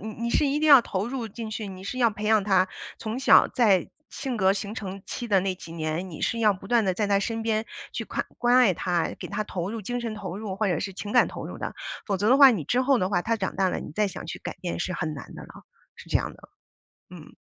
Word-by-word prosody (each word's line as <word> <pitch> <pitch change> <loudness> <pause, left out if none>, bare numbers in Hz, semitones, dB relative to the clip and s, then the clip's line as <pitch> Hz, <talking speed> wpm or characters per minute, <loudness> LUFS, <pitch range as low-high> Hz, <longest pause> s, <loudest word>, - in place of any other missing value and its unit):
你 220 - -6
你 235 - -1
是 290 - +3
一 280 +2 +1
定 310 0 +2
要 275 -4 +10
投 200 -2 -3
入 245 -3 -4
进 225 +1 -7
去， 215 -1 -4
你 190 0 -9
是 250 +5 -4
要 235 -2 +4
培 210 0 -7
养 215 -1 +4
他 190 -2 +3 0.3
从 225 +3 -4
小 265 - +6
在 200 -8 +3 0.2
性 260 -4 -4
格 190 -1 +4
形 205 +1 -4
成 195 -2 -6
期 240 -2 -5
的 195 -2 +4
那 190 0 -1
几 165 -2 -11
年。 165 +3 -3
你 160 - -9
是 230 - 0
要 215 -3 +4
不 195 +1 -10
断 235 -1 +3
地 185 -1 +1
在 210 +1 0
他 200 -1 +3
身 225 +2 -2
边 220 0 0 0.3
去 - - -4
看 - - -3
关 245 0 +4
爱 240 -7 +6
他， 175 -1 0
给 - - -7
他 210 +1 -2
投 185 -1 -4
入， 225 -2 -5
精 245 +5 -3
神 230 -2 -4
投 200 -3 -6
入， 205 -3 -5
或 215 0 0
者 175 -4 0
是 195 0 -4
情 205 +2 -6
感 245 - +5
投 - - -7
入 - - -8
的。 - - -5 0.3
否 200 -3 0
则 205 +3 +1
的 265 - +5
话 275 -2 +10
你 195 - -1
之 250 - +1
后 265 0 +3
的 185 -1 0
话 175 -3 +1
他 230 +1 0
长 190 -3 -3
大 190 -1 +2
了， - - -2
你 - - -8
再 210 -2 +1
想 - - -8
去 170 +2 -6
改 - - -6
变 175 -1 -3
是 185 - -2
很 160 -3 -3
难 140 - -10
的 - - -9
了， - - -12 0.5
是 - - -14
这 - - +3
样 - - -3
的， - - -17 0.6
嗯。 - - -13
210 Hz, 300 characters per minute, -26 LUFS, 190-230 Hz, 0.6 s, 要